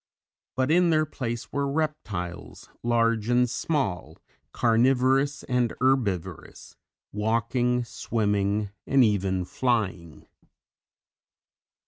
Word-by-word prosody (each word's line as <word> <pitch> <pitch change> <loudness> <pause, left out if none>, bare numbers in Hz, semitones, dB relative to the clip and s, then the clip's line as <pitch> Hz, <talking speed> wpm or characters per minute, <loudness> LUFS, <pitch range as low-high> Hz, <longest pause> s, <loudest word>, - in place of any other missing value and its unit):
But 130 +2 +1
in 175 +1 +4
their 155 -1 +3
place 120 -6 -5
were 140 0 -1
reptiles 110 - -4
large 115 -2 +1
and 125 0 +3
small, 100 - -2 0.3
carnivorous 130 +4 +2
and 125 -2 0
herbivorous, 125 -10 -1 0.4
walking, 115 +3 0
swimming 105 -3 -1 0.2
and 135 -1 +5
even 95 -4 +1
flying. 95 -10 -2
120 Hz, 85 wpm, -26 LUFS, 105-130 Hz, 0.4 s, and